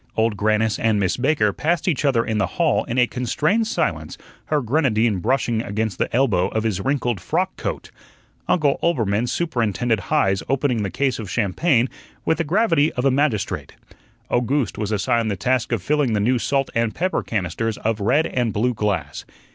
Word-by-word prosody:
Old 110 -1 +2
Grannis 110 +1 +1
and 110 -2 +2
Miss 95 -2 +1
Baker 125 -6 +1
passed 165 - -1
each 150 -4 +1
other 120 -5 +2
in 110 -1 -1
the 95 - +1
hall - - +2
in 120 - -4
a 125 - +5
constrained 150 - 0
silence, 225 - -2 0.3
her 150 - +1
grenadine 120 - +1
brushing 120 +1 0
against 110 -2 -3
the - - 0
elbow 110 -8 +2
of 110 - -2
his 105 -4 -1
wrinkled 120 -5 -1
frock - - -1
coat. - - -5 0.6
Uncle 150 -5 +2
Oelbermann 115 -8 +1
superintended 120 - 0
Heise 95 +1 +1
opening 130 -4 +1
the 100 - -2
case 130 +7 -1
of 105 -4 -6
champagne 120 - +1 0.4
with 160 - +1
the - - +2
gravity 165 -3 +2
of 125 - -2
a 135 - +4
magistrate. 105 - -1 0.6
Owgooste 125 +2 0
was 105 0 -2
assigned 110 +2 +1
the 100 - -1
task 125 +7 0
of 115 -6 -1
filling 145 -5 +1
the 105 - +1
new 120 +4 +2
salt 135 +2 0
and 115 -2 0
pepper 185 +2 0
canisters 110 +2 -2
of 110 -1 -1
red 135 +10 +2
and 120 -3 -1
blue 120 +4 +1
glass. 95 -10 -2
115 Hz, 180 wpm, -22 LUFS, 105-140 Hz, 0.6 s, a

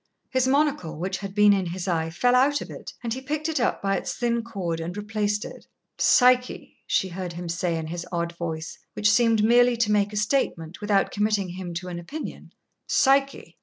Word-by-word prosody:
His 260 -1 +2
monocle, 280 - +1
which 190 +3 -3
had 195 -1 -7
been 210 -1 +6
in 190 -2 0
his 180 +2 -5
eye, 165 -2 0
fell 245 +9 +1
out 275 +3 +4
of - - -8
it, - - -8
and 230 -1 -2
he 260 - -5
picked 300 +3 -3
it 320 -3 -1
up 245 - 0
by 195 0 +1
its - - -4
thin 235 -1 0
cord 190 -8 -4
and 170 +4 -5
replaced 210 0 -1
it. - - -11 0.3
"Psyche!" 250 0 +3
she 190 - +1
heard 180 -1 -5
him 175 +1 -6
say 170 0 -1
in 160 - -4
his 170 +2 -6
odd 170 -1 -2
voice, 165 -1 -5
which 210 0 +2
seemed 225 -1 +3
merely 240 +2 +5
to 225 -2 +1
make 205 -1 +2
a 210 - -5
statement 205 - -1
without 205 -1 +1
committing 210 -2 0
him 175 -1 -6
to 175 +2 -5
an 175 -1 -5
opinion 295 - -8 0.4
"Psyche!" 275 0 +1
205 Hz, 205 wpm, -25 LUFS, 175-245 Hz, 0.4 s, been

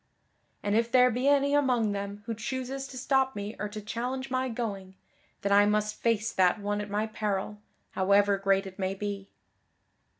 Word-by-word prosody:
And 205 0 +1
if 230 +1 +1
there 250 -1 +6
be 250 +4 -1
any 280 0 +4
among 250 -7 +2
them 200 +1 -5
who 230 - -3
chooses 260 +4 -4
to 265 - -10
stop 265 0 +1
me 205 +1 -5
or 210 +1 -3
to 215 +1 -6
challenge 250 +5 -4
my 260 0 0
going, 200 -5 -5 0.5
then 200 - 0
I 205 +1 +6
must 210 0 0
face 225 -1 +1
that 185 +2 +3
one 205 0 -2
at 205 - -6
my 210 +2 0
peril, 210 -1 -3 0.3
however 200 +1 +3
great 195 0 +2
it 190 0 -10
may 190 0 -1
be." 200 -1 -5
210 Hz, 180 wpm, -28 LUFS, 200-250 Hz, 0.5 s, there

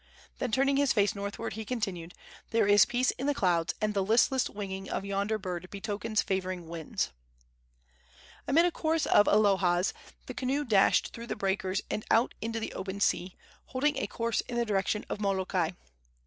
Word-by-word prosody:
Then 245 - -2
turning 275 +4 +2
his 280 -2 +3
face 205 -2 +2
northward, 200 +3 -5
he 220 - -5
continued: 195 -8 -4 0.3
"There 225 -1 +2
is 205 0 +6
peace 245 +1 +1
in 270 - -4
the 290 - +1
clouds, 175 -7 +1
and 215 0 0
the 200 -1 +1
listless 235 +5 +3
winging 195 -2 -6
of 195 - -3
yonder 200 +2 -1
bird 185 -3 -5
betokens 210 +2 -2
favoring 185 -3 -3
winds." 165 -2 -3 1.4
Amid 325 +5 +5
a 355 - +2
chorus 320 -2 0
of 205 - +5
alohas! 190 -4 +3 0.3
the - - -6
canoe 275 +3 -1
dashed 205 -5 +3
through 235 0 -8
the - - -3
breakers 195 0 -1
and 215 - -2
out 230 +3 +3
into 225 +1 -2
the 220 - -5
open 190 +1 -5
sea, 185 -2 0 0.3
holding 290 +3 0
a 205 - -2
course 230 +2 -1
in 240 - -6
the 235 - +1
direction 210 0 0
of 210 - -4
Molokai. 190 -3 0
205 Hz, 175 wpm, -29 LUFS, 190-235 Hz, 1.4 s, is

